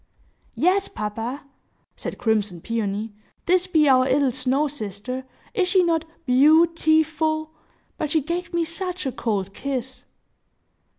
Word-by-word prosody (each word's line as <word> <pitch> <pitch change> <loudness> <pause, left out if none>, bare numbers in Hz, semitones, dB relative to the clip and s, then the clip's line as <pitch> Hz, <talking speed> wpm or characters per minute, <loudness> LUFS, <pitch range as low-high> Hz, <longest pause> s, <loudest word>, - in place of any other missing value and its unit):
"Yes, 385 +3 +2
papa," 225 +6 -4 0.5
said - - -6
crimson 210 -6 0
Peony. 215 +1 -3 0.3
"This 365 +1 +3
be 315 -5 +3
our 255 -1 +5
'ittle 270 0 +3
snow 260 +5 +1
sister. 255 -1 -5 0.3
Is 385 -6 +1
she 370 0 +4
not 325 -2 +1 0.2
beau 300 +6 +6
ti 315 -1 +3
ful? 315 0 -2 0.5
But 305 - -1
she 315 - +3
gave 340 +4 -3
me 340 -1 +1
such 360 +1 -4
a 265 - 0
cold 200 -5 -2
kiss!" 260 -1 -5
285 Hz, 135 wpm, -23 LUFS, 235-330 Hz, 0.5 s, beau